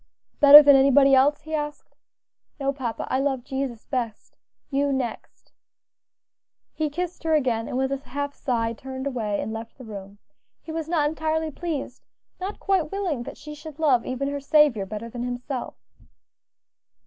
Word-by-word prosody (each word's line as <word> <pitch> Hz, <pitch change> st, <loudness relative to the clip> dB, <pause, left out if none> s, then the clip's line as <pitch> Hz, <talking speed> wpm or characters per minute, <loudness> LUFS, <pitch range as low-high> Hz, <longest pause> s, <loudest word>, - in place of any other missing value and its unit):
"Better 290 Hz, +1 st, +11 dB
than 285 Hz, -1 st, +7 dB
anybody 275 Hz, 0 st, +5 dB
else?" 275 Hz, +3 st, +4 dB
he 315 Hz, +1 st, -9 dB
asked 295 Hz, -1 st, -4 dB, 0.6 s
"No, 275 Hz, 0 st, 0 dB
papa, 250 Hz, -5 st, -4 dB
I 260 Hz, -, +2 dB
love 270 Hz, -2 st, -1 dB
Jesus 265 Hz, -3 st, -4 dB
best; 235 Hz, -5 st, -4 dB, 0.4 s
you 280 Hz, +1 st, +1 dB
next." 255 Hz, -4 st, -5 dB, 1.2 s
He 310 Hz, -1 st, -1 dB
kissed 350 Hz, +4 st, -4 dB
her 320 Hz, -1 st, +2 dB
again, 240 Hz, -6 st, 0 dB
and -, -, -3 dB
with 265 Hz, +1 st, 0 dB
a 275 Hz, -, 0 dB
half 285 Hz, +1 st, -5 dB
sigh 230 Hz, -4 st, -1 dB
turned 260 Hz, +3 st, -7 dB
away 220 Hz, -7 st, -2 dB
and 220 Hz, -, -4 dB
left 225 Hz, +1 st, -8 dB
the 255 Hz, -, -11 dB
room. 200 Hz, -2 st, -9 dB, 0.4 s
He 320 Hz, -, -9 dB
was 320 Hz, -1 st, -4 dB
not 310 Hz, -4 st, +2 dB
entirely 315 Hz, +1 st, -1 dB
pleased; 315 Hz, -2 st, -5 dB, 0.4 s
not 385 Hz, +3 st, -5 dB
quite 375 Hz, -6 st, 0 dB
willing 370 Hz, -10 st, -2 dB
that 240 Hz, -, -8 dB
she 300 Hz, 0 st, -9 dB
should 305 Hz, 0 st, -10 dB
love 275 Hz, -7 st, +3 dB
even 255 Hz, +2 st, -3 dB
her 285 Hz, 0 st, -3 dB
Saviour 280 Hz, -8 st, +3 dB
better 215 Hz, +3 st, -6 dB
than 240 Hz, +1 st, -7 dB
himself. 245 Hz, +2 st, -4 dB
275 Hz, 165 wpm, -24 LUFS, 245-300 Hz, 1.2 s, Better